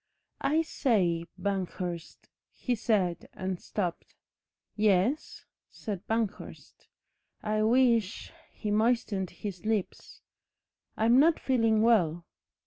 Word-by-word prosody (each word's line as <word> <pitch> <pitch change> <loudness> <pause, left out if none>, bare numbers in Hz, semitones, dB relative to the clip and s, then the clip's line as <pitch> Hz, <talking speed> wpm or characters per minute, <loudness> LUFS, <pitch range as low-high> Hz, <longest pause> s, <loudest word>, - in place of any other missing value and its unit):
"I 305 +4 +2
say, 185 - +1
Banghurst," 180 -4 -4 0.2
he 250 - -3
said, 205 -7 0
and 185 -1 -4
stopped. 180 -5 -4 0.6
"Yes," 210 +7 +1 0.2
said 205 -4 -6
Banghurst. 225 -2 -4 0.6
"I 215 0 0
wish 230 -3 +2
" - - -31
He 210 - -4
moistened 215 -4 +1
his 180 -1 -7
lips. 215 -3 -3 0.7
"I'm 230 +4 +5
not 320 +3 +4
feeling 225 -4 +2
well." 175 -8 +3
215 Hz, 100 wpm, -29 LUFS, 185-230 Hz, 0.7 s, I'm